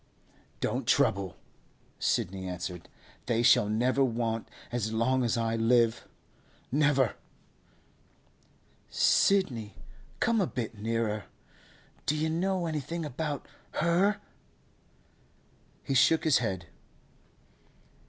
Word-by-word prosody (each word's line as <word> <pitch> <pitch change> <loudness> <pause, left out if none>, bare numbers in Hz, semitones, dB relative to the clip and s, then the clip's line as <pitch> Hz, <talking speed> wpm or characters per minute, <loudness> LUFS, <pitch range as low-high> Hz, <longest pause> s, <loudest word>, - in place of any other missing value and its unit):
'Don't - - -1
trouble,' 95 -2 +2 0.6
Sidney 95 +1 -1
answered. 90 -1 -6 0.4
'They 120 -1 +1
shall 105 -3 +5
never 125 +5 +2
want 115 -2 -1 0.2
as 115 -3 -1
long 125 +3 +1
as 120 -1 0
I 115 0 0
live—never!' 125 +3 0 1.8
'Sidney, 120 - +2 0.4
come 230 -2 +2
a 185 - +1
bit 115 -2 -4
nearer. 110 -1 -2 0.8
Do 150 - +2
you 160 +1 0
know 185 +2 0
anything 160 +1 -3
about 150 0 -4 0.3
her?' 180 +6 +2 1.6
He - - -2
shook 160 +5 +4
his 155 -4 +4
head. 95 -7 -3
120 Hz, 95 wpm, -29 LUFS, 110-155 Hz, 1.8 s, shall